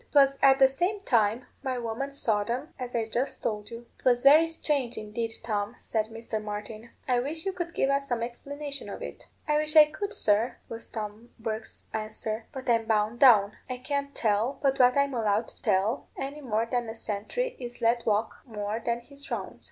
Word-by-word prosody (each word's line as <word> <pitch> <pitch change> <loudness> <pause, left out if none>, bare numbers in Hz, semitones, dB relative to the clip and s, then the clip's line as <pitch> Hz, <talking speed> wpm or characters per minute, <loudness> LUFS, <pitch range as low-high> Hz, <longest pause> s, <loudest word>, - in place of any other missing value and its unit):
'Twas 275 -1 +5
at 270 -1 +7
the 270 -1 +7
same 355 +10 -1
time 230 - +2 0.2
my 260 -2 -2
woman 235 +3 -3
saw 220 -7 +1
them, 255 +9 -4
as 250 -1 -5
I 230 -1 +1
just 240 +5 -2
told 210 -2 -2
you." 235 +1 -8
"'Twas 245 -1 +3
very 305 +4 +8
strange, 290 -6 -1
indeed, 225 +2 -3
Tom," 210 0 -2
said 220 -1 -1
Mr. 225 -1 -5
Martin; 215 +2 -6 0.2
"I 250 -2 +3
wish 310 +7 -4
you 385 - 0
could 345 -2 -4
give 270 - +2
us 275 0 0
some 240 -3 -1
explanation 280 +4 -6
of - - -6
it." - - -8 0.2
"I 300 0 +3
wish 305 +1 0
I 305 -1 +11
could, 400 +6 -4
sir," 215 - +2
was 230 0 -7
Tom 215 +1 -6
Bourke's 220 0 -5
answer; 220 0 -3
"but 265 -3 -7
I'm 230 -2 +3
bound 220 +1 +1
down. 210 -6 +6
I 255 - -2
can't 280 +2 -3
tell 220 +4 +1
but 275 0 +2
what 250 +1 +6
I'm 280 -1 +2
allowed 220 -2 +1
to - - -17
tell, 210 +4 +1
any 280 +2 -5
more 225 -4 0
than 240 0 -1
a 225 - -6
sentry 225 - -3
is 245 -1 -7
let 235 0 +2
walk 215 +1 0
more 215 -1 -4
than 235 0 -1
his 280 +3 -13
rounds." - - -4
240 Hz, 200 wpm, -28 LUFS, 220-275 Hz, 0.2 s, I